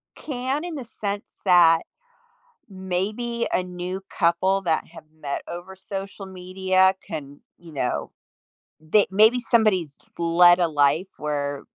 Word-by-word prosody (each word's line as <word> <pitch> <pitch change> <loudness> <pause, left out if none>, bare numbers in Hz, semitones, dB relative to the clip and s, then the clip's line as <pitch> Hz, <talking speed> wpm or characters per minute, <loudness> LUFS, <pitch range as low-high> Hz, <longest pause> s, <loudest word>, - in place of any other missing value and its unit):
can 270 +2 -3
in 350 - -5
the 275 - -5 0.2
sense 200 0 -2 0.2
that 170 -3 +6 0.9
maybe 205 +5 -3
a - - +2
new 180 +1 -6
couple 185 +2 +1
that 165 -4 0
have 165 -1 -13 0.2
met 140 -1 -4
over 175 +3 -8
social 195 +1 -7
media 190 0 +1
can, 145 -2 -7 0.2
you 170 -2 -14
know, 130 -4 -2 0.7
they 160 +7 +3
maybe 215 +5 +5
somebody's 210 - +1 0.2
led 175 +1 +5
a 170 - +3
life 150 +4 +2
where 145 -2 -3
185 Hz, 125 wpm, -24 LUFS, 165-200 Hz, 0.9 s, that